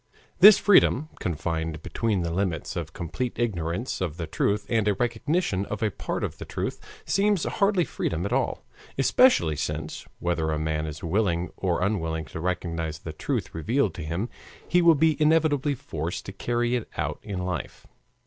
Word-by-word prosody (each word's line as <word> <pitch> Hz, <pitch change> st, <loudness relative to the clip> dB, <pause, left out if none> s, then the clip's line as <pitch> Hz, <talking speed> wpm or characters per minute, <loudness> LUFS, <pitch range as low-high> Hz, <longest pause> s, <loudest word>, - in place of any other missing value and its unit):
This 205 Hz, +3 st, +10 dB
freedom, 155 Hz, -8 st, +4 dB
confined 80 Hz, -1 st, -3 dB
between 110 Hz, -5 st, 0 dB
the 85 Hz, -1 st, -2 dB
limits 90 Hz, -4 st, -2 dB
of -, -, -4 dB
complete 120 Hz, +9 st, -4 dB
ignorance 95 Hz, -1 st, -2 dB
of 85 Hz, -3 st, -2 dB
the 85 Hz, -, -3 dB
truth 100 Hz, +6 st, 0 dB
and 110 Hz, -3 st, +1 dB
a 105 Hz, -, +3 dB
recognition 120 Hz, -, 0 dB
of 105 Hz, +1 st, -4 dB
a 105 Hz, -, +1 dB
part -, -, -4 dB
of -, -, -4 dB
the -, -, -5 dB
truth, -, -, -4 dB, 0.3 s
seems 200 Hz, -3 st, +2 dB
hardly 200 Hz, -4 st, +2 dB
freedom -, -, -2 dB
at -, -, -2 dB
all, -, -, -1 dB, 0.3 s
especially 240 Hz, -, +4 dB
since, -, -, -4 dB
whether 85 Hz, -2 st, -1 dB
a 80 Hz, -, 0 dB
man 80 Hz, 0 st, -1 dB
is 75 Hz, -1 st, -7 dB
willing 90 Hz, -1 st, 0 dB
or 90 Hz, -2 st, 0 dB
unwilling 80 Hz, -6 st, -1 dB
to 70 Hz, -, -7 dB
recognize 85 Hz, -3 st, -2 dB
the -, -, -8 dB
truth -, -, -3 dB
revealed 105 Hz, -, 0 dB
to 85 Hz, -, -6 dB
him, 85 Hz, +9 st, -2 dB, 0.4 s
he 180 Hz, -, +4 dB
will 170 Hz, -1 st, +6 dB
be 155 Hz, +1 st, +2 dB
inevitably 150 Hz, -2 st, +3 dB
forced 80 Hz, -, -5 dB
to -, -, -6 dB
carry 120 Hz, +3 st, 0 dB
it 120 Hz, -, -3 dB
out -, -, -2 dB
in 100 Hz, -3 st, -5 dB
life. 90 Hz, -2 st, -4 dB
95 Hz, 175 wpm, -26 LUFS, 80-130 Hz, 0.4 s, This